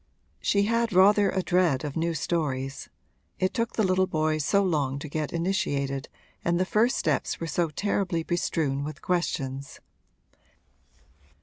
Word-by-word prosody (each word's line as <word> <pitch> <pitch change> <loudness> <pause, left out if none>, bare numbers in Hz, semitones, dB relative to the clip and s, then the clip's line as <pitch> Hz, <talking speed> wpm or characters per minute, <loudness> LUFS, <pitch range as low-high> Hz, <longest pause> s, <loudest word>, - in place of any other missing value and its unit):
She 200 0 +2
had 230 +1 +1
rather 200 +2 +5
a 190 - -1
dread 175 -8 +2
of 145 - -5
new 165 0 0
stories 135 -4 -2 0.5
it 185 0 0
took 230 -1 -1
the 220 - +1
little 185 0 +2
boys 155 -1 0
so 200 +7 +3
long 145 -7 0
to 145 - -6
get 150 0 -3
initiated 145 -7 -1 0.3
and 170 0 +1
the 185 - +2
first 230 +7 +2
steps - - 0
were 165 - -3
so 165 0 0
terribly 185 0 -1
bestrewn 155 -5 -1
with 150 0 -7
questions. 140 -6 -2
170 Hz, 145 wpm, -27 LUFS, 145-190 Hz, 0.5 s, rather